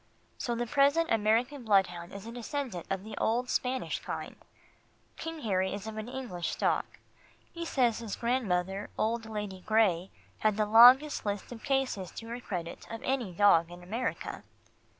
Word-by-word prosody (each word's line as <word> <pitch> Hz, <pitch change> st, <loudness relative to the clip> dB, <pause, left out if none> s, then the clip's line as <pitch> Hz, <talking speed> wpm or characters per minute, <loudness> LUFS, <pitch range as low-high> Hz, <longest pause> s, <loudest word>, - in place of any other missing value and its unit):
So 240 Hz, -, -1 dB
the 240 Hz, +1 st, -1 dB
present 285 Hz, +6 st, +3 dB
American 230 Hz, +5 st, +2 dB
bloodhound 185 Hz, -5 st, +2 dB
is 200 Hz, +1 st, -8 dB
a 230 Hz, -, -7 dB
descendant 240 Hz, -, -4 dB
of 195 Hz, -1 st, -2 dB
the 220 Hz, -, -8 dB
old 245 Hz, +3 st, 0 dB
Spanish 255 Hz, +1 st, -1 dB
kind. -, -, -6 dB, 0.8 s
King 325 Hz, -1 st, -6 dB
Harry 190 Hz, -3 st, 0 dB
is 200 Hz, 0 st, -7 dB
of 220 Hz, -1 st, -6 dB
English 225 Hz, -7 st, -5 dB
stock. -, -, -1 dB, 0.6 s
He 335 Hz, 0 st, -5 dB
says 245 Hz, -8 st, +2 dB
his 225 Hz, -3 st, -5 dB
grandmother, 200 Hz, -6 st, -1 dB
old 225 Hz, +1 st, 0 dB
Lady 210 Hz, -3 st, -5 dB
Gray, 195 Hz, -5 st, +2 dB, 0.3 s
had 215 Hz, -1 st, +2 dB
the 215 Hz, -, +2 dB
longest 245 Hz, +7 st, +7 dB
list 205 Hz, +1 st, -3 dB
of 230 Hz, -2 st, -8 dB
cases 265 Hz, -9 st, 0 dB
to 225 Hz, -, -8 dB
her 240 Hz, +1 st, -4 dB
credit 180 Hz, -7 st, -6 dB
of 225 Hz, -, -7 dB
any 255 Hz, -7 st, -1 dB
dog 170 Hz, -3 st, +4 dB
in 175 Hz, 0 st, -11 dB
America. 225 Hz, +8 st, -3 dB
220 Hz, 160 wpm, -30 LUFS, 195-250 Hz, 0.8 s, longest